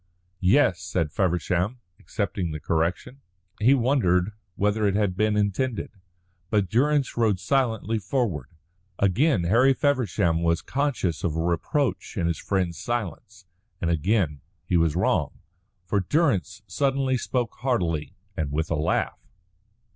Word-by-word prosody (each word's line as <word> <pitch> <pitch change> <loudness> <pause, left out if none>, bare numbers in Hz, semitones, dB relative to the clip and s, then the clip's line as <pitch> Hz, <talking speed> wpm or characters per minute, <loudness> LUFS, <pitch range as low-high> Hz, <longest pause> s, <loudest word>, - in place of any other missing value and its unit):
"Yes," 95 -1 +3
said 90 -4 -1
Feversham, 90 - 0 0.2
accepting 100 -4 -3
the 75 -1 -5
correction. 85 - -2 0.4
He 125 +6 +5
wondered 110 -8 +2 0.2
whether 105 +1 +1
it 100 - +1
had 100 -3 +1
been 105 +1 +1
intended. 105 +4 -1 0.6
But 100 -4 +1
Durrance 140 +3 +2
rode 110 -5 +2
silently 115 -3 0
forward. 105 - -2 0.5
Again 100 - +2
Harry 120 +10 +4
Feversham 110 - +1
was 85 -1 +1
conscious 130 - -1
of 80 -3 -1
a - - -1
reproach 95 - -1
in 85 - 0
his 85 -1 -1
friend's 90 -5 -1
silence, 105 -4 -4 0.3
and 85 -2 0
again 80 - +1 0.2
he 90 - 0
was 80 -2 +3
wrong. 90 -4 0 0.5
For 100 +3 +1
Durrance 100 - 0
suddenly 135 -2 0
spoke 125 -2 -2
heartily, 85 - -1 0.2
and 75 -3 -2
with 80 +3 -2
a - - +2
laugh. 75 +2 0
100 Hz, 130 wpm, -25 LUFS, 85-125 Hz, 0.6 s, He